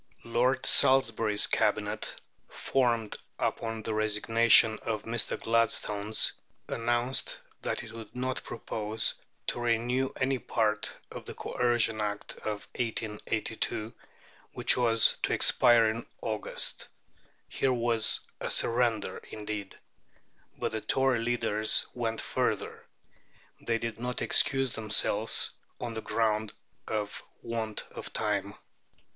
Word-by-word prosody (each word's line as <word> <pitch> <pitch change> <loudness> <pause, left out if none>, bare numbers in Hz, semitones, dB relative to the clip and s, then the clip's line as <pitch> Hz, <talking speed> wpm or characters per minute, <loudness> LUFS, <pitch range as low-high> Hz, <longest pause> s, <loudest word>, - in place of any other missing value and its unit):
Lord 125 +3 +1
Salisbury's 115 -5 +4
Cabinet, - - -1 0.3
formed 120 -5 0 0.2
upon 115 -1 -2
the 110 - -2
resignation 110 +1 +5
of 110 -2 -3
Mr. 115 0 +1
Gladstone's, 110 -2 +1 0.3
announced 120 +2 0 0.2
that - - -3
it 110 - -10
would 115 +1 -10
not 130 +1 -3
propose 110 -1 -1 0.3
to - - -2
renew 120 +3 0
any 130 0 +1
part 110 -2 -1 0.2
of - - -8
the - - -6
Coercion 120 -3 +1
Act 105 -1 -3
of 105 -2 -5
1882, 110 -1 -3 0.6
which - - +3
was 115 -3 +5
to - - 0
expire 115 -2 +5
in 115 +1 -5 0.2
August. 110 -2 -2 0.6
Here 135 - 0
was 115 -2 +2 0.2
a - - -3
surrender 115 -1 0
indeed! 105 -2 -6 0.8
But - - -2
the 110 -1 -3
Tory 130 -1 +1
leaders 115 -2 +1
went 115 -2 -2
further. - - -2 0.7
They 115 -1 0
did 115 -1 -5
not 125 +1 -3
excuse 135 -2 +2
themselves 110 -1 +3 0.3
on 120 -2 -4
the 110 - -4
ground 110 -2 -1 0.3
of 105 -2 -3 0.2
want 115 -2 -3
of - - -8
time. - - -2
115 Hz, 115 wpm, -29 LUFS, 110-120 Hz, 0.8 s, resignation